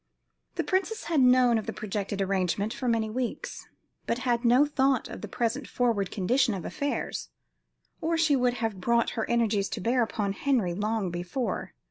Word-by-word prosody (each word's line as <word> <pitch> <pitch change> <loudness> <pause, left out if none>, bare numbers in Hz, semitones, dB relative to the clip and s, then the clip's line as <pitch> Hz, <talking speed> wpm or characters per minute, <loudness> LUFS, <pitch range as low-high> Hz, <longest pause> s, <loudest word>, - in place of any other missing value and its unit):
The - - 0
princess 390 +4 -1
had 320 -5 +1
known 250 -2 +5
of 215 - -8
the 220 - -3
projected 200 -1 -3
arrangement 195 +2 0
for 255 - -4
many 225 -2 +2
weeks, 245 +2 -4 0.4
but 230 - +1
had 240 -1 +1
no 250 +4 +5
thought 275 -2 +1
of - - -8
the - - -5
present 240 +4 -2
forward 225 -6 0
condition 235 +3 +1
of 185 - -6
affairs, 285 0 -3 0.7
or 330 +1 +1
she 315 -3 +3
would 250 -2 +2
have 220 -5 -3
brought 235 +3 +2
her 225 - -3
energies 220 -4 +1
to - - -4
bear 240 +6 +1
upon 210 -3 -1
Henry 225 -7 +1
long 205 0 -1
before. 175 +9 -3
235 Hz, 175 wpm, -28 LUFS, 205-255 Hz, 0.7 s, known